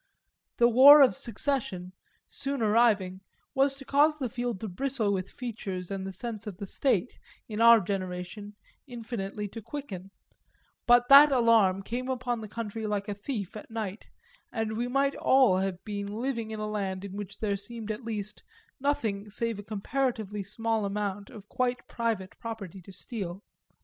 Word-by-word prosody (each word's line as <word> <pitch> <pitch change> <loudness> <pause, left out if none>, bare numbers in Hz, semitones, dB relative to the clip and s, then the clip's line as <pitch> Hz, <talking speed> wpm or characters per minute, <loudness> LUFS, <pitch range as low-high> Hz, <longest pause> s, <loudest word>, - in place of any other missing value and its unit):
The 235 - +6
war 275 +5 +9
of 260 - +4
Secession, 230 -7 -1 0.3
soon 275 -3 -3
arriving, 210 -4 +3 0.3
was 270 +1 +2
to 275 0 -11
cause 300 +3 +3
the 260 -5 -3
field 240 -4 -3
to 220 - -3
bristle 220 +1 -1
with 185 -1 -3
features 200 -7 -6
and 195 -1 -3
the - - -4
sense 220 +2 -5
of 195 -4 -6
the 200 - -5
State, 240 +1 0 0.3
in 215 0 -3
our 230 0 +8
generation, 190 +1 -5 0.3
infinitely 220 -4 -5
to 225 +3 -8
quicken; 200 -8 -7 0.8
but 245 0 +6
that 285 +2 +10
alarm 225 -7 +4
came 250 +5 -4
upon 245 -2 -2
the 215 - -6
country 220 0 -5
like 205 0 -2
a 205 - -2
thief 205 -2 -5
at 215 - -9
night, 220 -2 -5 0.4
and 220 -1 -2
we 240 +2 -1
might 275 +2 +1
all 260 -8 +4
have 190 -1 -1
been 200 -2 -4
living 230 0 -3
in 220 -1 -5
a 215 - -2
land 200 -2 -3
in 195 -1 -8
which 205 -2 -7
there 205 -2 -1
seemed 220 +2 -5
at 215 +4 -6
least 210 -2 -5 0.4
nothing 225 -8 -1
save 230 +1 -1
a - - -7
comparatively 215 -1 -2
small 225 +3 -1
amount 200 0 -3
of 210 -4 -12
quite 250 +1 -2
private 225 -5 -2
property 200 -5 -7
to 185 - -13
steal. 195 -2 -6
220 Hz, 170 wpm, -28 LUFS, 200-245 Hz, 0.8 s, that